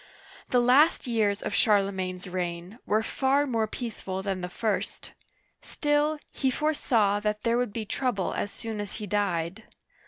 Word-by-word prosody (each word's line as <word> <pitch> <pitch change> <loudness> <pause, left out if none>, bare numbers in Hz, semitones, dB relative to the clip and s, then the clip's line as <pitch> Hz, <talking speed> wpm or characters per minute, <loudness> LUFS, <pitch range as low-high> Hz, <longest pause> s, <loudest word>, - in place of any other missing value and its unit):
The 250 - +4
last 270 +8 +5
years 215 -4 +1
of - - -3
Charlemagne's 190 -3 +1
reign 180 +3 -4
were 215 +1 +2
far 275 +5 +2
more 230 -5 0
peaceful 200 -5 -5
than 190 -2 -2
the 180 - -4
first; 215 +3 -2 0.5
still, 295 +1 +1
he 265 - 0
foresaw 240 -8 +2
that 210 0 -2
there 235 +1 +2
would 245 -4 -1
be 220 +1 -4
trouble 220 -4 -1
as 205 - -2
soon 220 -2 -5
as 205 - -5
he 215 - -5
died. 195 -2 -1
215 Hz, 155 wpm, -27 LUFS, 195-245 Hz, 0.5 s, last